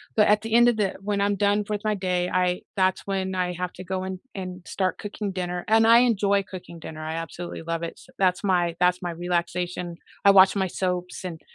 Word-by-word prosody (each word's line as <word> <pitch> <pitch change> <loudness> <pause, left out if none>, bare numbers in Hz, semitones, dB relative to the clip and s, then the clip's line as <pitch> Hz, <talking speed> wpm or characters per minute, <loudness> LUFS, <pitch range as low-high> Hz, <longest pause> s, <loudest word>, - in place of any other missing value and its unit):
but 210 - +5
at 210 0 +4
the 225 0 -4
end 240 +1 +7
of 235 - 0
the 200 -3 0
when 205 0 -1
I'm 200 0 +2
done 205 +1 +2
with 210 -1 -2
my 215 0 +1
day, 180 -2 -1
I 180 0 +1 0.2
that's 185 0 +1
when 190 -1 -2
I 180 -1 0
have 180 0 -4
to 185 - -9
go 185 +1 -3
in 190 -1 -5
and 185 -1 -6
start 185 -2 -1
cooking 205 -1 -5
dinner- 180 -1 -3
and 225 +1 +5
I 230 +1 +8
enjoy 200 -5 +2
cooking 180 -3 -10
dinner. 155 -1 -8
I 160 - -3
absolutely 165 +1 -6
love 165 0 -3
it 170 - -4
s - - -16
that's 185 0 +2
my 175 -3 +2
that's 180 0 +3
my 175 -1 -3
relaxation. 175 0 -2 0.3
I 200 - +9
watch 190 0 +7
my 190 -1 +1
soaps 180 0 -3
and 165 -3 -6
185 Hz, 230 wpm, -25 LUFS, 180-200 Hz, 0.3 s, I